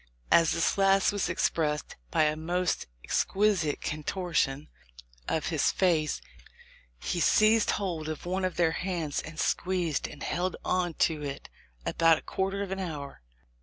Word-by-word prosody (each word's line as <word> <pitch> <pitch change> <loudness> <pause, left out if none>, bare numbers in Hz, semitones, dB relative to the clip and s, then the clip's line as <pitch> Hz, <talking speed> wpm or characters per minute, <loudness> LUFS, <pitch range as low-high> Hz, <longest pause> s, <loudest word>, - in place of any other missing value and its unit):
"As 165 -1 +5
this 165 - +1
last 195 0 +4
was 200 -4 -1
expressed 155 -3 0
by - - +3
a 150 0 +2
most 175 +3 -1 0.2
exquisite 190 -7 +1
contortion 155 -2 -1 0.6
of - - -1
his - - +2
face, 160 -5 +1 0.8
he 175 - -2
seized 215 +5 +4
hold 170 -6 -3
of 155 +1 -5
one 185 +2 -1
of 185 -1 -1
their 170 -2 +3
hands, 170 -4 -2
and 155 0 -9
squeezed, 175 -5 0
and 145 - -10
held 175 +3 -1
on 180 -3 0
to 155 -2 +1
it 140 -1 -6 0.4
about 165 -1 +4
a - - -10
quar 190 0 -1
ter 200 +1 -3
of 195 - -6
an 195 - -2
hour. 145 - -6
170 Hz, 155 wpm, -29 LUFS, 155-190 Hz, 0.8 s, As